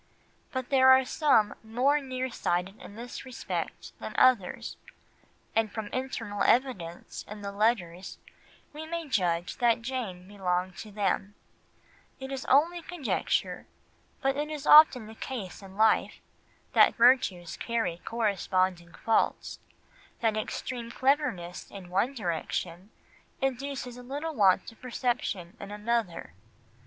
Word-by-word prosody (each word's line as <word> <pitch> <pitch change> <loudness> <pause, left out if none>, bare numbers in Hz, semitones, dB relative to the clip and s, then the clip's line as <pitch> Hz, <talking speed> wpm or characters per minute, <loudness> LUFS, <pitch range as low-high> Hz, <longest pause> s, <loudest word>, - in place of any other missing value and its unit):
But 260 -2 -4
there 260 -1 +6
are 260 0 +7
some 250 -7 +3
more 250 +7 +2
near 260 -1 -3
sighted 180 0 -2
in 205 - -11
this 240 +2 -7
respect 255 -3 -5
than - - -7
others, 240 -8 +3 0.8
and 220 -2 +2
from 215 -1 -5
internal 230 -6 -4
evidence 195 -11 0
in 210 0 -9
the 200 - -4
letters 195 -4 0 0.6
we 310 +1 -7
may 335 -1 -4
judge 175 -8 0
that 235 -2 +2
Jane 225 -8 -4
belonged 185 -2 -2
to 215 - -8
them; 200 0 -1 0.8
it 265 0 -7
is 270 -1 -4
only 335 +6 +3
conjecture, 335 -6 -2 0.6
but 270 0 +2
it 295 +1 -2
is 300 -2 -5
often 300 -6 +8
the 220 - -10
case 220 -5 -6
in 195 0 -12
life, 220 +1 +3 0.6
that - - +6
virtues 230 -9 +3
carry 225 -8 -2
corresponding 185 -5 0
faults, 225 - +1 0.6
that 225 -2 +1
extreme 230 +2 -4
cleverness 245 - 0
in 185 -3 -10
one 225 +9 +1
direction 175 -1 -3 0.5
induces 270 -1 -3
a - - -9
little 290 +6 -4
want 195 -6 +3
of 225 - -21
perception 235 -7 -2
in 200 - -8
another. 210 - -2
225 Hz, 130 wpm, -29 LUFS, 190-260 Hz, 0.8 s, often